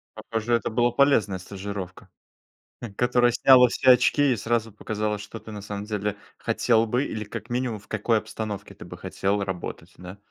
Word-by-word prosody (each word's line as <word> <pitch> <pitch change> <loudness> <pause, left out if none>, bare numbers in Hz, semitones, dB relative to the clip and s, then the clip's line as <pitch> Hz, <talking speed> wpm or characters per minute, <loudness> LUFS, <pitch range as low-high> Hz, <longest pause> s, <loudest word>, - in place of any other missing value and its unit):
Похоже, 115 +1 -1
это 115 - -1
была 120 +2 +2
полезная 120 -7 +3
стажировка, 95 0 -7 0.7
хм, 115 -5 -7
которая 120 +1 +3
сняла 125 +1 +6
все 130 +2 +4
очки 135 +2 +4
и - - -1
сразу 115 +1 -1
показала, 105 0 -3
что 105 +2 -9
ты 110 - -11
на 105 -1 -7
самом 100 0 -6
деле 105 -1 -3 0.2
хотел 115 -2 +2
бы 125 +5 0
или 110 -5 -4
как 110 +1 -8
минимум 120 -3 -2
в 100 - -21
какой 110 +1 +1
обстановке 110 -1 -5
ты - - -11
бы - - -10
хотел 100 +1 -1
работать, 95 -2 -6
да? 90 +2 -10
110 Hz, 180 wpm, -25 LUFS, 100-120 Hz, 0.7 s, сняла